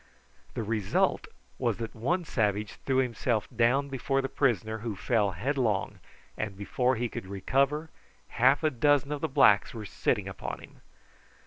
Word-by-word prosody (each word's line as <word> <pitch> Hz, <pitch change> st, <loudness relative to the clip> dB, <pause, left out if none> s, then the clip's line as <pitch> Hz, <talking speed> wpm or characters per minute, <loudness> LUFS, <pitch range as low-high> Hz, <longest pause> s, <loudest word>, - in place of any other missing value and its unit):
The 115 Hz, -, -2 dB
result 105 Hz, -2 st, 0 dB, 0.3 s
was -, -, 0 dB
that 115 Hz, -1 st, -5 dB
one 165 Hz, +11 st, -1 dB
savage 105 Hz, -6 st, 0 dB, 0.2 s
threw 135 Hz, -1 st, +2 dB
himself 120 Hz, -3 st, 0 dB
down 125 Hz, +5 st, +3 dB
before 135 Hz, 0 st, -1 dB
the 135 Hz, -, -2 dB
prisoner, 110 Hz, -, 0 dB
who 110 Hz, -1 st, -4 dB
fell 105 Hz, +2 st, +1 dB
headlong, 110 Hz, -, -1 dB, 0.4 s
and 100 Hz, -3 st, -4 dB
before 125 Hz, +5 st, 0 dB
he 120 Hz, +2 st, -1 dB
could 95 Hz, -, -7 dB
recover, 140 Hz, -, 0 dB, 0.4 s
half 135 Hz, +6 st, +3 dB
a 155 Hz, -, +3 dB
dozen 145 Hz, +2 st, +2 dB
of 145 Hz, -1 st, -3 dB
the 160 Hz, -, 0 dB
blacks 105 Hz, -5 st, +4 dB
were 110 Hz, -2 st, -6 dB
sitting -, -, -1 dB
upon -, -, -5 dB
him. -, -, -15 dB
120 Hz, 155 wpm, -29 LUFS, 105-135 Hz, 0.4 s, blacks